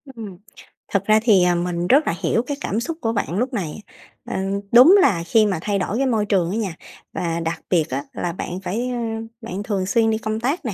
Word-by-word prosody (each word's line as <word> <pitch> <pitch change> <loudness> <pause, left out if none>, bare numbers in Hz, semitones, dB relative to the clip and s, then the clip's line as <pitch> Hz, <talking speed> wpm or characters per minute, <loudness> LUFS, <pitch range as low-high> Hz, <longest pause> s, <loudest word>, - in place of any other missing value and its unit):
Ừm, 205 -6 -8 0.6
thực 200 0 +1
ra 215 0 +5
thì, 200 -6 +5
à, 175 -1 +3
mình 175 0 -2
rất 285 +4 +4
là - - +1
hiểu 230 - +2
cái 285 -1 -3
cảm 215 -4 -1
xúc 320 +7 -4
của 225 0 0
bạn 190 -3 -2
lúc 250 +3 -1
này. 190 -1 -4 0.4
Ờ, - - -5 0.4
đúng 255 +11 +8
là 175 -10 +2
khi 215 +5 +4
mà 190 -5 -1
thay 200 0 -1
đổi 200 +5 -2
cái 270 - +1
môi 225 -5 +1
trường 185 -4 +1
á 215 - -2
nha, 195 -7 -3 0.4
và 170 -1 -2
đặc 165 0 -3
biệt 165 -4 +2
á 135 +2 -3
là 175 - -3
bạn 180 +1 -5
phải, 235 +8 -2
ơ, 245 - -3 0.4
bạn 205 -2 -5
thường 195 -3 -2
xuyên 225 +3 +2
đi 220 - 0
công 220 0 -3
tác 270 +6 -2
nè, 215 - -2
205 Hz, 240 wpm, -21 LUFS, 180-230 Hz, 0.6 s, đúng